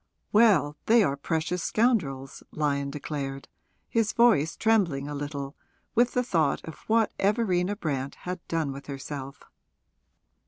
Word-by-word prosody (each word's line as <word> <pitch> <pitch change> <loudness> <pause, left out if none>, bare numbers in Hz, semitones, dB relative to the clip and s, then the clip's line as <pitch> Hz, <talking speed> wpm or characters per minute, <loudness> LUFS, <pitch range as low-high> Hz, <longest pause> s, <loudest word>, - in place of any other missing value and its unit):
'Well, 195 -10 +4
they 230 0 +6
are 140 -7 +1
precious 160 +4 -2
scoundrels,' 160 - 0
Lyon 140 -2 -1
declared, 140 -1 -5 0.4
his 225 -3 +1
voice 215 -10 +4
trembling 180 -11 +2
a 145 - -5
little 145 -1 -5 0.4
with 240 +1 +3
the 250 - +1
thought 160 - +1
of 160 - -9
what 225 0 +3
Everina 200 -2 +1
Brant 140 -8 -3
had 180 0 -5
done 160 -4 -1
with 140 +1 -9
herself. 140 0 -7
160 Hz, 130 wpm, -27 LUFS, 140-210 Hz, 0.4 s, they